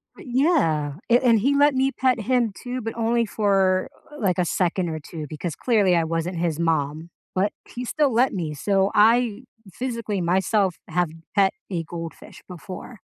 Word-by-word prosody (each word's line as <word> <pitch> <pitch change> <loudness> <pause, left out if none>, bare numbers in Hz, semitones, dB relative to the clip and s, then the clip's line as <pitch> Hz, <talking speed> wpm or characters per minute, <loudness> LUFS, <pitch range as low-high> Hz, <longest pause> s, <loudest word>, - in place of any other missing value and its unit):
But - - -13
yeah, 165 - +2 0.2
and 240 -2 +5
he 275 +6 +2
let 290 -1 +4
me 265 +1 +2
pet 255 -3 +1
him 235 -1 +1
too, 250 0 -4
but 225 +1 -5
only 230 +1 +2
for 195 -3 +2 0.2
uh 295 - -11
like 185 -4 +1
a 180 - +2
second 175 0 0
or 155 -1 -4
2, 155 0 -8
because 155 +1 -5
clearly 205 -7 +2
I 165 -1 +2
wasn't 165 +2 -2
his 165 -3 0
mom, 160 0 -1 0.2
but 195 +2 +1 0.2
he 250 +1 -6
still 290 +2 +1
let 245 +3 +3
me, 160 -5 -3
so 195 +5 +1
I 230 +2 +4 0.3
physically 230 -3 -3
myself 190 +2 +1
have 175 -2 0 0.3
pet 195 -1 +4 0.2
a 170 -3 -2
goldfish 165 0 -9
before. 185 +6 -9
195 Hz, 175 wpm, -23 LUFS, 170-240 Hz, 0.3 s, and